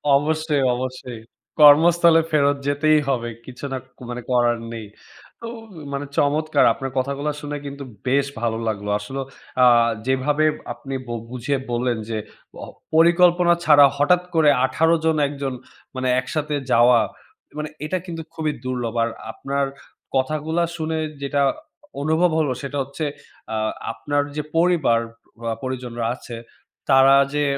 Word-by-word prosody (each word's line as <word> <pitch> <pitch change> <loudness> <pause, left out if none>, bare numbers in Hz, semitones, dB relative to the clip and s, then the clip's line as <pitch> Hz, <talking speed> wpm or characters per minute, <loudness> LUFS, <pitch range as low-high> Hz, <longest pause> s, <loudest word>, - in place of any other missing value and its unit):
অবশ্যই, 155 -1 +1
অবশ্যই। 125 -2 -6 0.4
কর্মস্থলে 165 +3 +7
ফেরত 145 -1 +3
যেতেই 155 +2 +3
হবে। 120 -3 -1 0.2
কিছু 130 +2 -9
না 130 - -2 0.3
মানে 120 0 -5
করার 120 -1 +3 0.2
নেই। 110 -2 -7 0.5
তো 230 - -6 0.5
মানে 140 +1 -3
চমৎকার। 150 0 +2
আপনার 135 -1 -6
কথাগুলো 140 +3 -1
শুনে 145 0 -4
কিন্তু 140 0 -7 0.2
বেশ 140 +2 +3 0.2
ভালো 115 -1 0
লাগলো। 105 -1 -3
আসলে 135 +6 -5 0.4
অ্যা 125 -1 +6 0.4
যেভাবে 145 +4 +1 0.3
আপনি 135 -1 -8
বু 120 - -4 0.2
বুঝিয়ে 125 +2 -2
বললেন 120 0 0
যে, 110 - -2 0.8
পরিকল্পনা 175 +1 +5
ছাড়া 145 -3 +7
হঠাৎ 175 +5 +3
করে 155 -2 +5 0.2
১৮ 160 +4 +2
জন, 160 -1 +3
১ 145 - -6
জন 135 -1 -2 0.4
মানে, 130 0 -2
একসাথে 150 +3 -3 0.2
যাওয়া 120 0 +6 0.6
মানে 150 0 -4 0.2
এটা 155 +5 -1
কিন্তু 165 -2 -6
খুবই 155 -1 -1
দুর্লভ। 125 -3 -3
আর 115 - 0 0.2
আপনার 140 0 -2 0.5
কথাগুলা 155 +5 0
শুনে 160 0 -2 0.2
যেটা 140 0 0 0.6
অনুভব 160 +3 +2
হলো, 145 -4 +1
সেটা 140 +1 -5
হচ্ছে, 140 +3 -5 0.4
অ্যা 110 - -2 0.3
আপনার 145 +6 -1
যে, 150 - -1 0.2
পরিবার 165 -9 +3 0.6
পরিজনরা 125 -3 -4
আছে 120 - -9 0.5
তারা 135 +1 +7 0.2
যে 150 - +1
140 Hz, 135 wpm, -22 LUFS, 130-155 Hz, 0.8 s, কর্মস্থলে